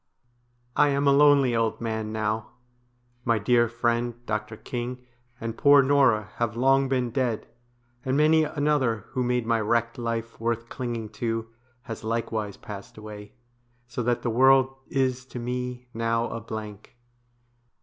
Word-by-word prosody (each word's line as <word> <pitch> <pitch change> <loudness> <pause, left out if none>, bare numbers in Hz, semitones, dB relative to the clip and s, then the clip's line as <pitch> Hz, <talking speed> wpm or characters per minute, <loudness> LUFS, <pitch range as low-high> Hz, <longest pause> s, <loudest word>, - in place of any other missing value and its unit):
I 145 - +5
am 140 0 +1
a 140 - +6
lonely 140 -3 +5
old 115 -1 0
man 110 -2 -3
now. 110 0 -2 0.7
My 115 -1 +2
dear 120 +2 +3
friend, 120 0 0
Dr. 105 0 -3
King, 125 +2 -5 0.3
and 115 0 -4
poor 140 +2 +6
Norah 130 -7 +3
have 115 -1 -1
long 135 +2 +3
been 125 -3 0
dead, 120 -3 -1 0.6
and 130 +1 0
many 155 +1 +5
another 145 -7 0
who 130 - -2
made 125 -1 0
my 115 -1 +1
wrecked 115 +2 0
life 115 -1 -3
worth 115 0 -2
clinging 120 -4 -4
to 115 -1 -1 0.3
has 115 -5 -7
likewise 110 -2 -2
passed 100 0 -10
away, 105 -1 -10 0.5
so 120 0 -4
that 120 0 0
the 120 - 0
world 130 +2 +5
is 130 -1 0
to 130 - -8
me 125 +1 -4
now 115 +1 0
a 115 - -5
blank. 110 0 -8
120 Hz, 150 wpm, -26 LUFS, 110-130 Hz, 0.7 s, a